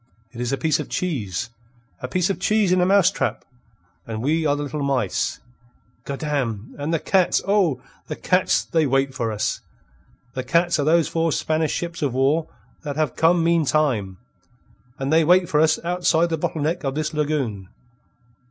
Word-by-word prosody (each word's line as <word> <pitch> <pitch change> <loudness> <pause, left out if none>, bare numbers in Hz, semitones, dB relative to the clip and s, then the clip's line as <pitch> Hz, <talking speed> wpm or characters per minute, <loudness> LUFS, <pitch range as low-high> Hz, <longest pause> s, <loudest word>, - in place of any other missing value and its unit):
It 120 -1 -8
is 125 +1 -2
a 135 - 0
piece 155 -1 +1
of - - -5
cheese 115 - -3 0.5
a 125 - -5
piece 180 +8 0
of 195 - -4
cheese 210 -1 +2
in 185 0 +3
a 180 - +3
mousetrap, 195 -1 +2 0.6
and 110 0 -4
we 155 +3 +1
are 145 - +2
the 145 - -3
little 145 +1 -4
mice. 140 -2 -1 0.7
Goddam! 135 -7 -3
And 145 +3 -2
the 165 - +2
cats 185 +3 +2
oh, 180 -11 +2 0.2
the - - -4
cats 180 0 +1
they 160 -3 +1
wait 135 0 +1
for 120 -3 -2
us! 105 - -2 0.7
The 130 - -3
cats 170 +4 +2
are - - +2
those 160 -1 +3
four 165 0 0
Spanish 155 +1 0
ships 170 -1 -4
of 135 -4 -1
war 145 +5 +2 0.3
that 145 -3 -5
have 155 -4 -1
come 165 +1 +3
meantime. 150 - +1 0.8
And 135 +3 -2
they 165 0 +5
wait 180 +2 +4
for 150 - +1
us 160 0 +4
outside 175 -1 +2
the 165 - 0
bottle 150 -1 -2
neck 160 +3 -1
of 135 -1 -2
this 155 0 -2
lagoon. 135 -11 -2
155 Hz, 180 wpm, -22 LUFS, 135-170 Hz, 0.8 s, they